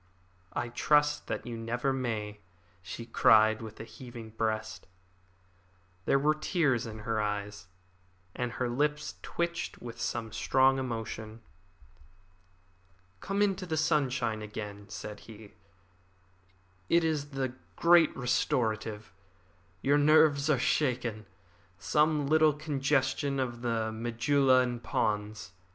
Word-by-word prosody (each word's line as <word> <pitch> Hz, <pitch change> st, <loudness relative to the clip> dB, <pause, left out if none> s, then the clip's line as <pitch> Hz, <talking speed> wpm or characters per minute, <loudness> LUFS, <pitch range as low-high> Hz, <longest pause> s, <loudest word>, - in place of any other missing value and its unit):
"I 120 Hz, -, -2 dB
trust 150 Hz, +4 st, +2 dB
that -, -, -4 dB
you 120 Hz, -1 st, -5 dB
never 120 Hz, +4 st, -1 dB
may," 110 Hz, -5 st, -3 dB, 0.4 s
she 95 Hz, +5 st, -7 dB
cried, 110 Hz, -2 st, +4 dB
with 110 Hz, -1 st, -9 dB
a -, -, -5 dB
heaving 115 Hz, 0 st, -10 dB
breast. 110 Hz, -4 st, -3 dB, 1.2 s
There -, -, +4 dB
were 150 Hz, +2 st, +3 dB
tears 155 Hz, -, 0 dB
in 110 Hz, -1 st, -7 dB
her 110 Hz, -2 st, 0 dB
eyes, 105 Hz, -1 st, -4 dB, 0.7 s
and 125 Hz, -1 st, -3 dB
her 125 Hz, -, -1 dB
lips 150 Hz, +5 st, -1 dB
twitched 170 Hz, 0 st, -3 dB
with 120 Hz, -1 st, -8 dB
some 115 Hz, -2 st, -3 dB
strong 135 Hz, +3 st, +3 dB
emotion. 110 Hz, -3 st, -5 dB, 1.8 s
"Come 200 Hz, -, 0 dB
into 195 Hz, -2 st, -1 dB
the 160 Hz, -2 st, -1 dB
sunshine 135 Hz, -8 st, +1 dB
again," 105 Hz, -1 st, -7 dB
said 105 Hz, -1 st, -7 dB
he. 105 Hz, -1 st, -12 dB, 1.4 s
"It 170 Hz, 0 st, +4 dB
is 150 Hz, -3 st, -1 dB
the 135 Hz, -3 st, -3 dB, 0.2 s
great 170 Hz, -1 st, +5 dB
restorative. 110 Hz, -3 st, -1 dB, 0.7 s
Your 145 Hz, +2 st, +4 dB
nerves 155 Hz, -1 st, +5 dB
are 150 Hz, -, +4 dB
shaken. 125 Hz, -5 st, 0 dB, 0.5 s
Some 150 Hz, +7 st, +2 dB
little 155 Hz, +1 st, +4 dB
congestion 140 Hz, -2 st, 0 dB
of 120 Hz, -2 st, -3 dB
the 115 Hz, -2 st, -1 dB
medulla 125 Hz, +4 st, +2 dB
and 120 Hz, -2 st, -2 dB
pons. 105 Hz, -3 st, -2 dB
125 Hz, 115 wpm, -30 LUFS, 110-145 Hz, 1.8 s, great